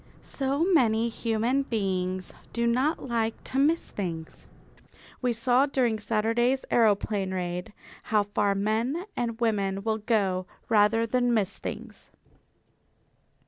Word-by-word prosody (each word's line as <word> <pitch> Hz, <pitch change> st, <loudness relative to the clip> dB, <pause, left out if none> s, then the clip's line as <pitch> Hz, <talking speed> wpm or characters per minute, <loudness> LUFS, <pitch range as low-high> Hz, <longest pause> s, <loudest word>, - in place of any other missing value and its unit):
So 275 Hz, +3 st, -1 dB
many 235 Hz, -, +3 dB
human 230 Hz, +3 st, 0 dB
beings 185 Hz, -6 st, -2 dB, 0.2 s
do 235 Hz, 0 st, 0 dB
not 260 Hz, +6 st, +1 dB
like 225 Hz, -2 st, -1 dB
to 265 Hz, -, -2 dB
miss 315 Hz, +4 st, +2 dB
things. 165 Hz, -5 st, -6 dB, 0.7 s
We 250 Hz, -1 st, +1 dB
saw 245 Hz, +4 st, +3 dB
during 245 Hz, -6 st, +1 dB
Saturday's 230 Hz, +4 st, +1 dB
aeroplane 205 Hz, -3 st, +2 dB
raid 180 Hz, 0 st, -3 dB, 0.3 s
how 215 Hz, -1 st, +2 dB
far 205 Hz, 0 st, 0 dB
men 225 Hz, -, -1 dB
and 230 Hz, -1 st, -2 dB
women 200 Hz, -4 st, 0 dB
will 220 Hz, 0 st, 0 dB
go 195 Hz, -5 st, 0 dB, 0.2 s
rather 225 Hz, +1 st, +4 dB
than 245 Hz, +1 st, +1 dB
miss 200 Hz, -4 st, 0 dB
things. -, -, -8 dB
225 Hz, 120 wpm, -27 LUFS, 205-245 Hz, 0.7 s, rather